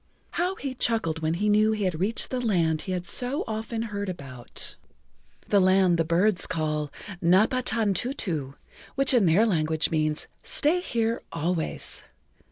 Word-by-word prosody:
How 360 +3 -1
he 275 -6 -5
chuckled 220 -10 +1
when 160 +1 0
he 205 +4 0
knew 215 +1 +4
he 210 -1 -2
had 180 -4 -1
reached 205 +5 0
the 255 - -1
land 165 -9 +1
he 185 - -5
had 180 0 -3
so 250 +6 0
often 225 +1 -3
heard 205 -3 -4
about, 135 -8 -6 0.7
the 205 - +5
land 185 -2 +4
the - - +4
birds 180 +4 +2
call 155 -3 -2 0.3
Napatantutu, 205 - +1 0.4
which 275 0 +3
in 230 -7 +4
their 185 +8 +4
language 160 -5 +1
means 155 -1 0
Stay 315 +4 +2
Here 230 -8 -1
Always. 165 0 -2
190 Hz, 150 wpm, -26 LUFS, 160-225 Hz, 0.7 s, the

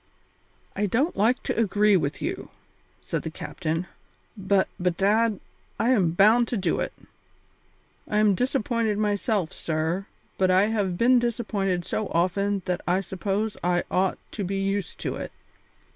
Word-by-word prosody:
"I 205 +1 0
don't 265 - +1
like 225 +6 +2
to - - -2
agree 210 -2 +3
with 150 -5 -1
you," - - -4 0.5
said - - -3
the - - -5
captain, 165 +3 -3 0.5
"but, 195 -1 +1
bedad, 200 +4 +2 0.4
I 235 - +3
am 185 -10 +3
bound 220 +6 +5
to 235 - -2
do 195 - 0
it. - - -2 1.2
I 210 - 0
am 210 -1 +4
disappointed 230 -2 0
myself, 205 -3 0
sir, 165 +5 -2 0.3
but 185 -1 +3
I 190 +3 +4
have 200 -5 -1
been 245 +3 +5
disappointed 205 -7 -1
so 215 - -2
often 195 +3 0
that 180 -2 -1
I 180 +2 +2
suppose 195 +3 -2
I 175 0 +2
ought 185 +1 +1
to 205 - -4
be 195 +1 -2
used 195 -2 -2
to - - -3
it. - - -6
200 Hz, 150 wpm, -25 LUFS, 185-220 Hz, 1.2 s, bound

